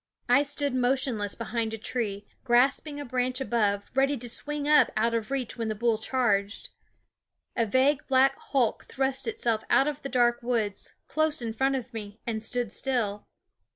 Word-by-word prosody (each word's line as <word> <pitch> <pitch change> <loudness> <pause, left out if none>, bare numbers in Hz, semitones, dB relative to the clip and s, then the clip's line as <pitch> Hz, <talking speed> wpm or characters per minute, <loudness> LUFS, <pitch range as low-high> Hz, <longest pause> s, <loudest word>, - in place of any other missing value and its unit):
I 250 +3 +5
stood 285 -1 -1
motionless 250 -5 0
behind 230 -1 -2
a - - -8
tree, 210 -3 -3 0.2
grasp 260 +4 +3
ing 290 -1 -6
a 290 - -5
branch 250 0 -1
above, 210 -6 0
ready 275 +2 +2
to 240 0 -4
swing 295 +2 -2
up 300 0 +5
out 230 +2 +2
of 225 -2 -2
reach 265 -4 -3
when 230 -1 -2
the 215 - -2
bull 225 0 +1
charged. 215 -4 0 0.9
A 230 -2 +1
vague 260 +5 +2
black 270 +1 +4
hulk 255 -6 +1
thrust 270 - -2
itself 235 - 0
out 275 - +4
of 295 -1 -3
the 275 - -5
dark 240 -1 +2
woods, 230 -4 -2
close 310 -1 0
in 230 -2 -3
front 270 +4 +1
of 255 -1 -5
me, 210 -1 -7
and 220 -2 -3
stood 235 -2 -2
still. 220 -6 -1
245 Hz, 180 wpm, -27 LUFS, 225-270 Hz, 0.9 s, I